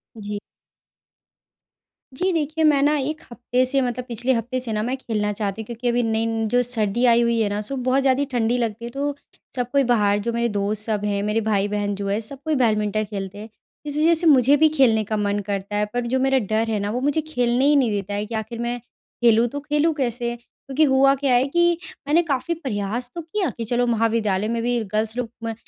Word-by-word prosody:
जी। 205 -1 -5 1.7
जी 370 +8 0
देखिए, 315 0 -1
मैं 290 -3 +4
न 290 - +4
1 300 +3 -3
हफ़्ते 245 +1 0
से 270 +2 +1
मतलब 250 0 -2
पिछले 240 +2 0
हफ़्ते 245 +2 -2
से 235 -3 -4
न 210 - -1
मैं 255 +2 -1
खेलना 210 -5 -2
चाहती 205 +1 -2
हूँ 220 - -8
क्योंकि 240 +1 -5
अभी 240 0 +2
नई 225 0 0 0.2
जो 245 0 +3
सर्दी 235 -1 0
आई 235 0 +5
हुई 235 -1 +1
है 205 - +1
न - - -1
सु 245 +6 -4
बहुत 255 +1 +1
ज़्यादा 265 0 +2
ही 285 - +1
ठंडी 240 0 +1
लगती 230 -1 -2
है - - -5
तो 280 +1 -2 0.4
सब 245 -1 -2
कोई 280 -1 +3
बाहर 210 -5 +2
जो 235 - 0
मेरे 235 0 0
दोस्त 205 +1 -1
सब 215 -2 -1
हैं 200 -1 0
मेरे 210 +2 0
भाई-बहन 205 -1 0
जो 200 0 -4
है 200 +2 0
सब 265 +5 -6
कोई 310 -1 +1
बैडमिंटन 215 -3 +1
खेलते 200 -1 -6
हैं। 215 +2 -9 0.4
इस 290 0 -4
वज़ह 325 +2 +4
से 330 +1 +2
मुझे 275 0 +6
भी 315 +1 +5
खेलने 225 -5 +4
का 215 +1 -2
मन 205 0 0
करता 200 0 -3
है 210 0 +1
पर 245 0 -1
जो 260 - +3
मेरा 270 0 +2 0.2
डर 225 +1 +1
है 215 -2 0
न 200 - -2
वो 245 +4 -2
मुझे 290 +3 +1
खेलने 250 -4 0
ही 295 - +5
नहीं 255 -6 +3
देता 205 0 -3
है 205 +1 -2
कि 220 +1 -6
आख़िर 225 +2 -5
मैं 240 +1 -2 0.4
खेलूँ 230 0 +5
तो 285 +4 -5
खेलूँ 295 +2 +1
कैसे? 240 -3 -2
क्योंकि 270 +4 -3
हुआ 275 -1 +5
क्या 270 -1 0
है 245 +2 +4
कि 345 +3 +2 0.3
मैंने 320 +4 +4
काफ़ी 300 +2 -1
प्रयास 240 - -4
तो 340 - -4
किया 345 +1 -2
कि 230 - -3
चलो 245 +2 +1
महाविद्यालय 220 -3 +1
में 230 +1 -1
भी 240 0 +1 0.2
गर्ल्स 220 +2 -1
लोग 230 -1 -4
240 Hz, 230 wpm, -22 LUFS, 215-270 Hz, 1.7 s, मुझे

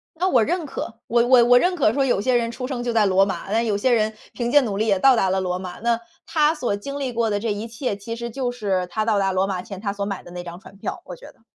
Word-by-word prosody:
那 360 +3 0
我 250 -10 +4
认 345 +4 -1
可。 230 -4 -6
我 235 +1 +2
我 245 -1 +6
我 245 +1 +6
认 360 +8 +1
可 275 -11 +2
说 275 +2 +1
有 245 -6 +1
些 255 +4 +1
人 230 -1 0
出 250 +2 -5
生 255 -2 -4
就 240 -1 -1
在 220 -3 +3
罗 190 0 +4
马， 195 0 -5
那 225 +2 +2
有 215 -3 0
些 230 +6 +1
人 220 -2 +2 0.2
凭 240 -1 -2
借 290 - +6
努 220 -7 -2
力 215 +2 0
也 200 -3 +2
到 265 +5 +5
达 190 -4 +2
了 190 0 +1
罗 180 -1 -2
马。 185 -1 -7
那 235 +1 +1 0.3
他 305 0 +2
所 245 -9 -1
经 280 +7 -6
历 260 -3 -2
过 230 -1 0
的 205 -1 -1
这 225 0 -1
一 205 +2 -5
切， 230 -1 -3
其 205 +3 -6
实 235 0 -5
就 245 0 -2
是 195 -6 -1
他 215 +4 -1
到 215 -2 +2
达 195 -1 +1
罗 185 +1 +1
马 185 -2 -3
前 195 -1 -9
他 200 -1 -2
所 200 0 -3
买 195 -2 -4
的 - - -13
那 175 0 -7
张 175 0 -8
船 195 - -15
票， 195 - -5
我 180 - -9
觉 - - -13
得。 - - -32
225 Hz, 330 characters per minute, -22 LUFS, 200-245 Hz, 0.3 s, 我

